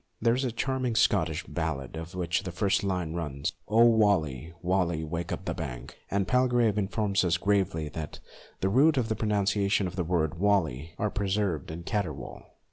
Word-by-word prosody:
There 115 Hz, -, +3 dB
is 130 Hz, +3 st, 0 dB
a 125 Hz, -, 0 dB
charming 130 Hz, 0 st, -1 dB
Scotch 115 Hz, -, +2 dB
ballad, 70 Hz, +2 st, -3 dB
of 80 Hz, +3 st, -7 dB
which 85 Hz, -1 st, 0 dB
the 95 Hz, -2 st, -5 dB
first 100 Hz, +2 st, +1 dB
line 90 Hz, -5 st, -1 dB
runs, 75 Hz, -5 st, -3 dB
" -, -, -41 dB
O 115 Hz, +3 st, +5 dB
waly, 90 Hz, -, +2 dB
waly 85 Hz, -3 st, +1 dB, 0.3 s
up -, -, -4 dB
the -, -, -1 dB
bank," -, -, -6 dB
and 100 Hz, -1 st, 0 dB
Palgrave 120 Hz, -4 st, +3 dB
informs 100 Hz, 0 st, 0 dB
us 85 Hz, -1 st, +2 dB
gravely 95 Hz, -5 st, +1 dB
that 75 Hz, -1 st, -6 dB, 0.4 s
the 95 Hz, -, +2 dB
root 140 Hz, +8 st, +4 dB
and 110 Hz, -3 st, +1 dB
pronunciation 100 Hz, -1 st, +1 dB
of 90 Hz, 0 st, -5 dB
the 90 Hz, -, 0 dB
word 80 Hz, -2 st, 0 dB
waly 85 Hz, -6 st, +1 dB
are 105 Hz, -2 st, -1 dB
preserved 95 Hz, -6 st, -1 dB
in 80 Hz, +2 st, -6 dB
caterwaul! 80 Hz, -, -4 dB
95 Hz, 175 wpm, -28 LUFS, 80-105 Hz, 0.4 s, O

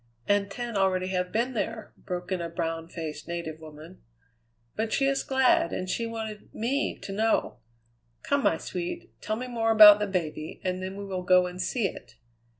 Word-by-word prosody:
"And 205 Hz, 0 st, +2 dB
ten 235 Hz, +2 st, -5 dB
already 185 Hz, -1 st, +1 dB
have 180 Hz, -1 st, -1 dB
been 240 Hz, +4 st, 0 dB
there," 220 Hz, -1 st, -4 dB
broke 180 Hz, 0 st, -6 dB
in 185 Hz, -2 st, 0 dB
a 170 Hz, -, -3 dB
brown 165 Hz, -1 st, -3 dB
faced 155 Hz, -3 st, -6 dB
native 170 Hz, -2 st, -5 dB
woman. 155 Hz, +3 st, -12 dB, 0.7 s
"But 220 Hz, 0 st, -2 dB
she 275 Hz, -, +2 dB
is 275 Hz, 0 st, +2 dB
glad, 275 Hz, +6 st, +3 dB
and 185 Hz, -, -3 dB
she 230 Hz, +5 st, -1 dB
wanted 220 Hz, -2 st, -6 dB
me 265 Hz, +6 st, -1 dB
to -, -, -6 dB
know! 215 Hz, -, 0 dB, 0.6 s
Come, 285 Hz, 0 st, +1 dB
my 165 Hz, -, +2 dB
sweet, 185 Hz, -, -5 dB
tell 215 Hz, -, -2 dB
me 250 Hz, +3 st, -4 dB
more 230 Hz, -2 st, -1 dB
about 210 Hz, -2 st, +10 dB
the 210 Hz, -, 0 dB
baby, 160 Hz, -5 st, -3 dB
and 185 Hz, 0 st, -2 dB
then 190 Hz, +1 st, -5 dB
we 200 Hz, -, -6 dB
will 190 Hz, -2 st, -3 dB
go 180 Hz, 0 st, +5 dB
and 180 Hz, +1 st, -5 dB
see 230 Hz, +2 st, 0 dB
it." -, -, -11 dB
195 Hz, 190 wpm, -27 LUFS, 180-225 Hz, 0.7 s, about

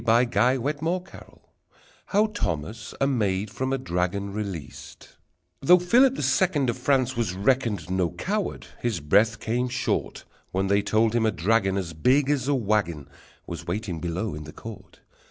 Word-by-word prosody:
How 115 Hz, +2 st, +5 dB, 2.1 s
Thomas 110 Hz, -, -3 dB
a 135 Hz, -, +3 dB
Maid 105 Hz, -6 st, 0 dB
from 130 Hz, +3 st, -2 dB
a 135 Hz, -, +1 dB
Dragon 100 Hz, -3 st, -2 dB
Released 100 Hz, -8 st, -7 dB, 0.5 s
Though 180 Hz, +6 st, +7 dB
Philip 245 Hz, +9 st, +4 dB
the -, -, -3 dB
Second 135 Hz, 0 st, +2 dB
Of -, -, -8 dB
France 130 Hz, -2 st, +1 dB
was 115 Hz, -6 st, -1 dB
reckoned 105 Hz, -4 st, +1 dB
No 95 Hz, -2 st, +1 dB
coward, 205 Hz, -, -3 dB, 0.2 s
his 120 Hz, -7 st, -1 dB
breath 105 Hz, +9 st, +3 dB
came 125 Hz, +3 st, -1 dB
short 130 Hz, +1 st, -2 dB, 0.3 s
When 95 Hz, +1 st, 0 dB
they 100 Hz, +1 st, +3 dB
told 110 Hz, +2 st, +2 dB
him 115 Hz, -2 st, +2 dB
a -, -, +2 dB
dragon 95 Hz, +2 st, +1 dB
As 85 Hz, -4 st, -3 dB
big 130 Hz, -, +3 dB
as 135 Hz, -3 st, 0 dB
a 145 Hz, -, +2 dB
wagon 100 Hz, -, -1 dB, 0.4 s
Was -, -, -7 dB
waiting 90 Hz, -2 st, -3 dB
below 90 Hz, +6 st, -3 dB
in 75 Hz, +1 st, -7 dB
the 75 Hz, -, -10 dB
court! 115 Hz, -3 st, -11 dB
110 Hz, 155 wpm, -25 LUFS, 95-130 Hz, 2.1 s, Though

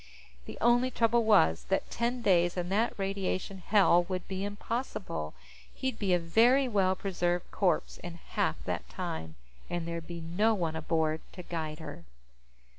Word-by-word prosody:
The -, -, -8 dB
only 240 Hz, +2 st, +4 dB
trouble 230 Hz, -1 st, +2 dB
was 80 Hz, -, +4 dB
that 195 Hz, -, -1 dB
ten 240 Hz, +1 st, -1 dB
days 175 Hz, -3 st, +3 dB
in 175 Hz, 0 st, -2 dB
that 215 Hz, +5 st, +1 dB
radiation 195 Hz, -1 st, -2 dB
hell 185 Hz, -2 st, +4 dB
would 185 Hz, 0 st, -4 dB
be 190 Hz, 0 st, -3 dB
impossible. 205 Hz, -, -4 dB, 0.4 s
He'd 260 Hz, -3 st, -3 dB
be 200 Hz, -3 st, 0 dB
a -, -, +4 dB
very 235 Hz, +11 st, +4 dB
well 195 Hz, -5 st, +2 dB
preserved 175 Hz, -2 st, -1 dB
corpse 180 Hz, -5 st, 0 dB
in 175 Hz, -1 st, -7 dB
half 170 Hz, -, -1 dB
that -, -, -3 dB
time, 80 Hz, 0 st, -5 dB, 0.3 s
and 175 Hz, -1 st, -3 dB
there'd 170 Hz, -1 st, -5 dB
be 170 Hz, -1 st, -6 dB
no 190 Hz, +7 st, +1 dB
one 165 Hz, -5 st, -2 dB
aboard 160 Hz, 0 st, 0 dB
to 180 Hz, -, -8 dB
guide 160 Hz, -3 st, -4 dB
her. 145 Hz, -, -8 dB
185 Hz, 160 wpm, -30 LUFS, 165-215 Hz, 0.4 s, only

